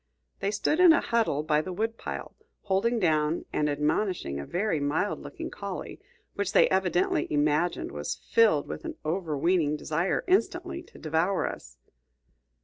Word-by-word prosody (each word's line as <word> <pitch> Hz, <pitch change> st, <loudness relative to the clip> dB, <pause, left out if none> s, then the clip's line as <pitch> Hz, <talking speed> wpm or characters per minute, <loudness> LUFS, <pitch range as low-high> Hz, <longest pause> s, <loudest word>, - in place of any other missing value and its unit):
They 195 Hz, -, 0 dB
stood 215 Hz, -, 0 dB
in 360 Hz, -3 st, +8 dB
a 330 Hz, -, +4 dB
huddle 225 Hz, -11 st, 0 dB
by 155 Hz, -1 st, +2 dB
the 185 Hz, -, -6 dB
woodpile, 225 Hz, +5 st, -4 dB, 0.3 s
holding 210 Hz, +4 st, +1 dB
down 155 Hz, -4 st, +1 dB
and 150 Hz, 0 st, +1 dB
admonishing 150 Hz, -, -1 dB
a 70 Hz, -, -6 dB
very 180 Hz, -3 st, 0 dB
mild 145 Hz, +8 st, 0 dB
looking -, -, -7 dB
collie, -, -, -6 dB, 0.3 s
which 200 Hz, -2 st, -2 dB
they -, -, +6 dB
evidently 180 Hz, -4 st, +1 dB
imagined 150 Hz, +3 st, +1 dB
was -, -, -3 dB
filled 460 Hz, 0 st, +2 dB
with -, -, -6 dB
an 330 Hz, -2 st, -5 dB
overweening 160 Hz, -1 st, +1 dB
desire 165 Hz, +5 st, -1 dB
instantly 370 Hz, -2 st, 0 dB
to 345 Hz, -, -17 dB
devour 165 Hz, +5 st, 0 dB
us. 65 Hz, 0 st, -8 dB
175 Hz, 145 wpm, -28 LUFS, 150-210 Hz, 0.3 s, in